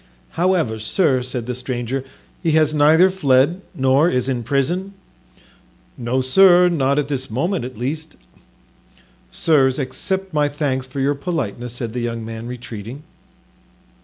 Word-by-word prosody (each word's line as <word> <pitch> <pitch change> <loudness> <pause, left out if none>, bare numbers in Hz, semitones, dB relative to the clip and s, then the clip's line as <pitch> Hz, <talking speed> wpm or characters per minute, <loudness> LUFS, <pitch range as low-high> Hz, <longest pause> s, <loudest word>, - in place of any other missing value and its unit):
"However, 170 -11 0
sir," 130 - +1
said 125 -2 -4
the 125 - -3
stranger, 125 +1 -3 0.4
"he 165 -3 +1
has 155 -1 +3
neither 160 +5 +5
fled 145 0 +2
nor 135 +5 +3
is 125 -3 0
in 130 -3 -1
prison?" 160 - -1 1.0
"No, 125 +2 -1
sir, 180 +6 +6
not 140 -4 +1
at 145 -2 0
this 135 -2 -3
moment 165 - -1
at 130 -3 -8
least." 155 +6 -4 1.1
"Sirs, 135 -5 +2
accept 190 +7 -3
my 150 -1 +2
thanks 140 -3 -2
for 130 +1 -6
your 140 +2 +2
politeness," 130 - -4
said 120 -2 -5
the 125 - -3
young 115 -1 -3
man, 115 +1 -7
retreating. 120 +2 -8
135 Hz, 140 wpm, -20 LUFS, 125-160 Hz, 1.1 s, sir